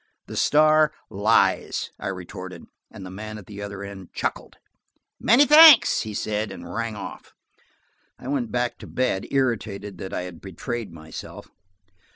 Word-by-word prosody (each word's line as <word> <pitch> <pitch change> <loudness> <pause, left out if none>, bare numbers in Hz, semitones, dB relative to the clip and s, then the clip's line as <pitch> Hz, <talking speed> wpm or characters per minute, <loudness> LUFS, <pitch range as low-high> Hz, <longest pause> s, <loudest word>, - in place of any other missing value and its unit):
"The - - -9
Star 155 +1 +4 0.2
lies!" 105 +3 +1
I - - -5
retorted, 90 -1 -7 0.2
and 95 - -10
the 90 - -8
man 110 +2 -7
at 100 - -11
the 100 0 -9
other 100 -1 -6
end 100 -3 -10
chuckled. - - -4 0.6
"Many 255 +6 +5
thanks," 300 -2 +8
he 110 -2 -6
said, 105 0 -2
and - - -9
rang 115 -1 -3
off. 105 - -9 0.8
I - - -11
went 130 -4 -2
back 125 0 -2
to - - -10
bed, 125 -7 -1
irritated 105 -7 -2
that 95 - -6
I - - -3
had 90 -2 -9
betrayed 105 +4 -6
myself. 80 -1 -10
105 Hz, 155 wpm, -24 LUFS, 95-125 Hz, 0.8 s, thanks